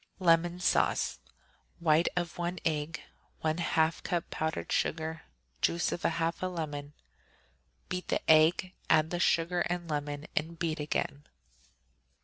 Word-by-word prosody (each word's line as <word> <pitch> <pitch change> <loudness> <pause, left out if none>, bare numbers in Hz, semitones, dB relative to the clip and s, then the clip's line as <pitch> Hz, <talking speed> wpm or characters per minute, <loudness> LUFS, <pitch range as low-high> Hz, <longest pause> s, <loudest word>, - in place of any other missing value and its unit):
Lemon 175 -1 +3
Sauce 180 - +2 0.6
White 165 0 +4
of 175 -1 -2
one 175 +1 -2
egg. 155 0 -1 0.4
1/2 160 0 +1
cup 175 -2 -2
powdered 160 0 -2
sugar. 160 0 -1 0.4
Juice 170 +1 +1
of 175 - -3
half 165 0 0
a 185 - 0
lemon. 150 -5 -5 0.9
Beat 180 0 -4
the - - -1
egg, 160 +4 +5 0.2
add 155 0 +4
the 175 - -1
sugar 170 +1 +2
and 175 -1 -2
lemon, 145 -1 -3
and 165 +2 -1
beat 165 -1 -1
again. 145 -1 -2
165 Hz, 125 wpm, -31 LUFS, 155-175 Hz, 0.9 s, egg